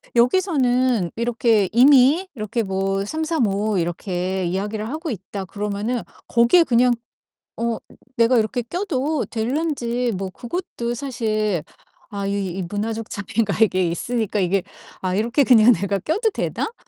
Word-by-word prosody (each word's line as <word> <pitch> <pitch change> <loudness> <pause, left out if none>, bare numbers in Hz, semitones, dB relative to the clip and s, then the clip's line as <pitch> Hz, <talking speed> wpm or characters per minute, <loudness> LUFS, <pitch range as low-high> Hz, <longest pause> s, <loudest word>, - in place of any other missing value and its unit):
여기서는 250 - +2
이렇게 230 -4 +2
이미 275 - +5
이렇게 220 +1 -2
뭐 195 0 -1
'삼삼오오 220 - 0
이렇게 180 +2 -2
이야기를 210 +5 -3
하고 320 +3 -4
있다.' 195 -1 -6
그러면은 210 +5 -3 0.3
거기에 235 +9 +5
그냥 245 -2 +3 0.7
어 230 0 -1 0.4
내가 235 +1 +4
이렇게 235 +3 0
껴도 305 - -2
될런지 245 -1 -1
뭐 190 0 -4
그것도 240 - -4
사실 215 - -1 0.5
아 200 -1 -5
이 200 - -1 0.3
이 - - -2
문화적 215 +5 -4
차이가 205 +1 -2
이게 185 -5 +3
있으니까 215 +4 -2
이게 190 +1 +1 0.4
'아 185 -1 -1
이렇게 235 +8 +2
그냥 240 -1 +7
내가 200 -2 -1
껴도 395 - 0
되나?' 435 - -3
230 Hz, 295 characters per minute, -22 LUFS, 200-250 Hz, 0.7 s, 그냥